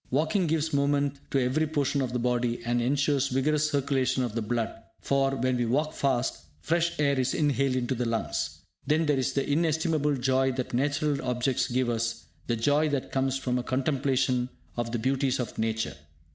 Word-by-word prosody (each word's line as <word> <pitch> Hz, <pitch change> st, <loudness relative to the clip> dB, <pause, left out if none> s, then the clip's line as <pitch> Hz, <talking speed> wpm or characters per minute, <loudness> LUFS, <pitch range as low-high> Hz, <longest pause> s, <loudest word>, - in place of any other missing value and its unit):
Walking 160 Hz, +7 st, +1 dB
gives 160 Hz, 0 st, 0 dB
movement 140 Hz, 0 st, +1 dB
to 135 Hz, -, +1 dB
every 135 Hz, +5 st, +1 dB
portion 145 Hz, -2 st, 0 dB
of 130 Hz, -2 st, -2 dB
the 125 Hz, -, -1 dB
body, 120 Hz, 0 st, 0 dB
and 120 Hz, 0 st, +1 dB
ensures 140 Hz, +2 st, +1 dB
vigorous 150 Hz, +4 st, +1 dB
circulation 135 Hz, -2 st, +1 dB
of 120 Hz, -4 st, -3 dB
the 115 Hz, -, -1 dB
blood; 115 Hz, +1 st, -1 dB, 0.3 s
for, 135 Hz, 0 st, +1 dB
when 130 Hz, 0 st, 0 dB
we 120 Hz, -1 st, 0 dB
walk 150 Hz, +6 st, 0 dB
fast, 130 Hz, -, 0 dB, 0.2 s
fresh 170 Hz, -, 0 dB
air 140 Hz, -2 st, +2 dB
is 130 Hz, 0 st, 0 dB
inhaled 140 Hz, -3 st, +1 dB
into 125 Hz, 0 st, 0 dB
the 125 Hz, -1 st, -2 dB
lungs. 115 Hz, -1 st, -2 dB, 0.3 s
Then 155 Hz, +2 st, +2 dB
there 145 Hz, -3 st, +2 dB
is 130 Hz, 0 st, 0 dB
the 140 Hz, 0 st, 0 dB
inestimable 155 Hz, -1 st, +1 dB
joy 130 Hz, +1 st, +2 dB
that 130 Hz, -1 st, -4 dB
natural 145 Hz, +2 st, 0 dB
objects 125 Hz, 0 st, 0 dB
give 125 Hz, 0 st, 0 dB
us, 115 Hz, -7 st, -2 dB, 0.2 s
the 120 Hz, -, +1 dB
joy 145 Hz, +7 st, +2 dB
that 140 Hz, -3 st, -2 dB
comes 135 Hz, 0 st, 0 dB
from 125 Hz, -2 st, -1 dB
a -, -, -3 dB
contemplation 130 Hz, -1 st, 0 dB, 0.3 s
of 120 Hz, -1 st, -2 dB
the 120 Hz, -, -1 dB
beauties 130 Hz, +2 st, 0 dB
of 120 Hz, -3 st, -4 dB
nature. 110 Hz, -6 st, -1 dB
135 Hz, 185 wpm, -28 LUFS, 125-145 Hz, 0.3 s, air